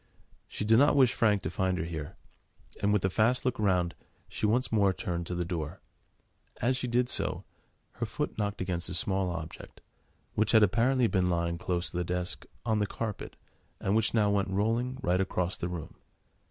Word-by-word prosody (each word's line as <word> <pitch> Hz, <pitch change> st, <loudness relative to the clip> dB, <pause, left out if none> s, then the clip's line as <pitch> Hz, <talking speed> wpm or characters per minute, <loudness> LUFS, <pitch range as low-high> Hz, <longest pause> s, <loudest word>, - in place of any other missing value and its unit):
She 105 Hz, -, -4 dB
did 110 Hz, +2 st, +5 dB
not 145 Hz, +1 st, +5 dB
wish 130 Hz, -3 st, +5 dB
Frank 105 Hz, -6 st, +2 dB
to 80 Hz, -, -3 dB
find 95 Hz, +1 st, 0 dB
her -, -, -1 dB
here, 80 Hz, -3 st, -6 dB, 0.7 s
and 100 Hz, -, +2 dB
with 105 Hz, -2 st, +2 dB
a 95 Hz, +3 st, 0 dB
last 125 Hz, +4 st, +3 dB
look 130 Hz, -1 st, 0 dB
round, 90 Hz, -4 st, +2 dB, 0.3 s
she 105 Hz, -, -1 dB
once 125 Hz, +5 st, +1 dB
more 100 Hz, -3 st, +3 dB
turned 85 Hz, -2 st, -3 dB
to 90 Hz, -, -3 dB
the 85 Hz, 0 st, -1 dB
door. 80 Hz, -4 st, -4 dB, 0.8 s
As 130 Hz, +3 st, +2 dB
she 125 Hz, -, -2 dB
did 120 Hz, +1 st, +2 dB
so, -, -, -1 dB, 0.5 s
her -, -, -4 dB
foot -, -, -3 dB
knocked 105 Hz, -2 st, -2 dB
against 90 Hz, -2 st, -2 dB
a -, -, -3 dB
small 95 Hz, +1 st, +1 dB
object, 85 Hz, -2 st, -7 dB, 0.5 s
which 110 Hz, +1 st, +1 dB
had 110 Hz, -1 st, +7 dB
apparently 120 Hz, +5 st, +3 dB
been 95 Hz, -5 st, +2 dB
lying 85 Hz, -1 st, 0 dB
close 85 Hz, -3 st, -2 dB
to -, -, -5 dB
the 90 Hz, -, +1 dB
desk, 90 Hz, +1 st, -3 dB, 0.2 s
on 110 Hz, -2 st, +1 dB
the 105 Hz, -, +1 dB
carpet, 110 Hz, 0 st, -5 dB, 0.4 s
and 95 Hz, -, 0 dB
which 110 Hz, +1 st, +2 dB
now 105 Hz, -2 st, +3 dB
went 100 Hz, -1 st, +1 dB
rolling, 115 Hz, +6 st, 0 dB
right 90 Hz, -4 st, +2 dB
across 90 Hz, -1 st, -1 dB
the 85 Hz, -, -3 dB
room. 85 Hz, -4 st, -6 dB
100 Hz, 195 wpm, -30 LUFS, 90-110 Hz, 0.8 s, had